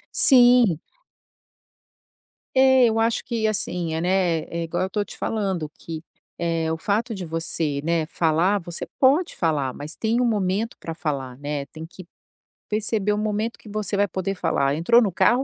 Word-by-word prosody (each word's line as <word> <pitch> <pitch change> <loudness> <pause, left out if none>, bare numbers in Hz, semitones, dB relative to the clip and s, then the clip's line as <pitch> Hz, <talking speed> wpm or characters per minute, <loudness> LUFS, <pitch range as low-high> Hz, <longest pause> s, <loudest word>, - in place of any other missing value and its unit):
Sim. 245 - +7 1.7
É, 260 -1 +5
eu 225 0 0
acho 225 0 0
que 225 -3 -1
assim, 180 -5 -1
eh, 160 - -2
né, 180 -2 +1
é 170 0 -5
igual 170 +2 -2
eu 190 - -2
tô 210 +1 -1
te - - -12
falando, 190 -8 -2
que, 160 -1 -7 0.4
eh, 165 -1 -1
o 160 - -2
fato 215 +7 -1
de 190 -2 -6
você, 160 -3 -1
né, 165 -1 0
falar, 170 +5 +1
você 170 0 -5
pode 290 +7 +3
falar, 145 -6 -1
mas 150 +3 -6
tem 230 +2 0
o - - +2
momento 210 0 -1
pra 165 - -6
falar, 135 -6 -4
né, 145 0 -4
tem 160 +1 -10
que 180 +2 -13 0.6
perceber 210 -1 0
o - - -2
momento 215 +2 -2
que 215 - -15
você 210 -1 -2
vai 205 0 +2
poder 190 +2 -3
falar. 140 -5 0
Entrou 235 +10 +4
no 205 -5 0
carro, 245 +9 +2
185 Hz, 175 wpm, -23 LUFS, 160-220 Hz, 1.7 s, Sim